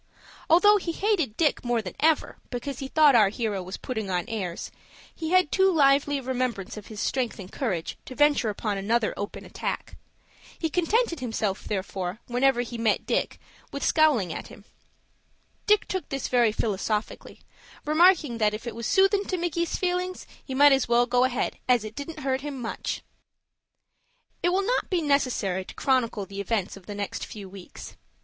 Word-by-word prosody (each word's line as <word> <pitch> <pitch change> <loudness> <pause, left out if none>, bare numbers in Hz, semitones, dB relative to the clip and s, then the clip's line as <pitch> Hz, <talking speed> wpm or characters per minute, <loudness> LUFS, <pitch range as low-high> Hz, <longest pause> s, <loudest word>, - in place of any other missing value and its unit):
Although 410 +6 +6
he 345 -4 -3
hated 340 - 0
Dick 315 -3 +2
more 240 -1 +1
than 190 -5 -6
ever, 315 0 +2
because 245 +1 -5
he 270 - -4
thought 300 0 +5
our 215 -5 +6
hero 210 -2 -2
was 185 +2 -6
putting 220 -6 -4
on 180 -2 -1
airs, 190 -6 -4 0.4
he 320 -1 -5
had 365 -3 +3
too 385 0 +4
lively 285 -2 +3
a 270 - -6
remembrance 250 -6 -2
of 210 -2 -9
his 215 -2 -8
strength 255 0 -1
and 190 -3 -9
courage 190 -11 -3
to 255 - -9
venture 290 -5 +3
upon 205 -1 -2
another 220 +3 +1
open 205 +1 -6
attack. - - -5 0.6
He 325 -2 -2
contented 360 +1 +1
himself, 225 -5 -2
therefore, 190 -1 -3
whenever 250 0 +2
he 240 -1 -6
met 225 -2 +1
Dick, - - -1 0.3
with 280 - -3
scowling 275 - +3
at - - -6
him. 205 - -14 1.0
Dick 420 -1 +4
took 375 -1 -4
this 275 -1 -3
very 240 -3 +4
philosophically, 210 0 -3 0.4
remarking 310 -5 +4
that, 210 -1 +2
"if 220 - -9
it 235 - -4
was 230 0 -4
soothin' 395 +1 +3
to 370 - -2
Micky's 340 -1 -1
feelings, 365 0 -2 0.2
he 265 - -6
might 285 0 +7
go 245 +1 +3
ahead, 255 -1 -2
as 245 -3 +4
it 215 0 -7
didn't 300 +4 -7
hurt 265 -1 -1
him 280 -2 -5
much." 230 -2 -4 1.4
It 350 - +2
will 380 +2 +1
not - - 0
be 355 -3 0
necessary 250 -10 +1
to - - -12
chronicle 235 -6 +1
the 200 +1 -6
events 200 -2 -2
of 195 -2 -15
the 205 - -6
next 200 -1 -4
few 205 -3 -8
weeks. 190 -1 -11
250 Hz, 175 wpm, -26 LUFS, 210-310 Hz, 1.4 s, might